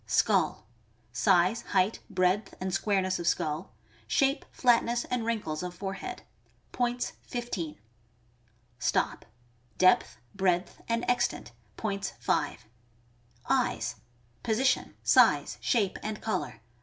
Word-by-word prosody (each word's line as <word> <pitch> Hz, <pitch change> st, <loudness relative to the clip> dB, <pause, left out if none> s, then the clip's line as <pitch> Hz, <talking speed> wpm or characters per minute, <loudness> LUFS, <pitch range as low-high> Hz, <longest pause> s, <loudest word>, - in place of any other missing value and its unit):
Skull. -, -, +2 dB, 0.3 s
— -, -, -34 dB, 0.2 s
Size, 185 Hz, -, +3 dB, 0.2 s
height, 190 Hz, +4 st, +2 dB
breadth, 185 Hz, +3 st, +1 dB
and 185 Hz, 0 st, -3 dB
squareness 195 Hz, -2 st, +1 dB
of 170 Hz, -, -3 dB
skull, 155 Hz, +2 st, -1 dB, 0.4 s
shape, 275 Hz, 0 st, +2 dB
flatness, 240 Hz, -1 st, +2 dB
and 245 Hz, -2 st, -2 dB
wrinkles 205 Hz, -10 st, -2 dB
of 180 Hz, 0 st, -5 dB
forehead. 200 Hz, -, -5 dB, 0.5 s
Points, 245 Hz, 0 st, -1 dB
15. 220 Hz, -10 st, -4 dB, 1.0 s
Stop.— 120 Hz, -, 0 dB, 0.5 s
Depth, 185 Hz, -9 st, +4 dB, 0.2 s
breadth, 185 Hz, -2 st, 0 dB
and 230 Hz, +1 st, 0 dB
extent. 245 Hz, 0 st, 0 dB, 0.3 s
Points, 200 Hz, -3 st, -3 dB
5. -, -, -1 dB, 0.8 s
Eyes. -, -, 0 dB, 0.2 s
— 120 Hz, 0 st, -36 dB
Position, 250 Hz, +3 st, +1 dB
size, -, -, +4 dB
shape, 205 Hz, -7 st, +1 dB
and 215 Hz, 0 st, -4 dB
color. 220 Hz, -, -3 dB
200 Hz, 110 wpm, -29 LUFS, 180-235 Hz, 1.0 s, Depth